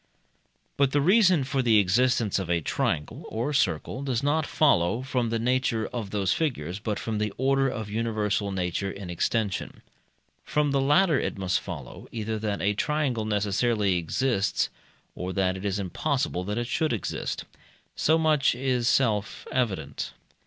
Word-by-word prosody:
But 140 -1 +2
the 145 - +4
reason 185 -1 +5
for 135 0 0
the 115 -3 +4
existence 105 +2 +2
of 95 - -4
a 85 -1 +2
triangle 75 -1 -2
or 115 +6 -2
a - - -4
circle 95 - 0
does 130 -2 -1
not 150 +2 +1
follow 115 - +2
from 125 -3 -1
the 115 - 0
nature 125 -1 +1
of 115 -5 -4
those 100 -2 +1
figures, 110 - -2
but 105 -1 -2
from 110 -2 -3
the 105 -1 -1
order 135 +1 +2
of 110 -4 -4
universal 105 -2 -1
nature 95 +1 -2
in 95 -2 -7
extension. 100 +4 -2 0.6
From 150 -1 +1
the 140 -1 +2
latter 150 +3 +4
it - - -3
must 95 -1 0
follow, 75 -9 -8
either 110 -1 -3
that 105 -2 -2
a 100 +1 +2
triangle 130 -2 0
necessarily 105 -1 +1
exists, 100 +4 0 0.4
or 90 +1 -4
that 95 -1 +1
it 95 - -7
is 100 -2 -1
impossible 125 - -1
that 105 +2 -3
it 120 - -1
should 155 +3 0
exist. 105 - -3 0.5
So 160 +2 +3
much 155 -6 +3
is 125 -2 0
self 110 -6 +1
evident. 105 - -2
115 Hz, 165 wpm, -26 LUFS, 100-135 Hz, 0.6 s, reason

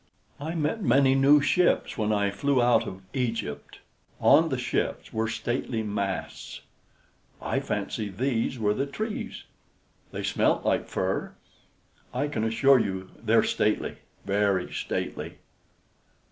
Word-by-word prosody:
I 160 +4 -4
met 160 +7 -1
many 135 -3 +4
new 140 +2 +6
ships 175 +5 +2
when 110 -1 0
I 100 -1 +1
flew 135 +6 +1
out 120 0 +3
of 95 0 -8
Egypt; 115 - -3 0.4
on 165 +1 +5
the 130 - -1
ships 125 - -2
were 110 0 0
stately 120 0 -2
masts; 100 -2 -4 0.8
I - - -1
fancy 105 -2 -3
these 120 +4 -1
were 105 -2 +1
the 135 +6 -2
trees. 215 +9 -5 0.7
They - - -5
smelt - - +1
like - - +1
fir. - - -2 0.8
I 145 - 0
can 110 -7 -2
assure 130 +4 +4
you 95 -3 -3
they're - - +4
stately - - 0 0.3
very 100 -2 +1
stately." - - -4
120 Hz, 130 wpm, -27 LUFS, 105-140 Hz, 0.8 s, new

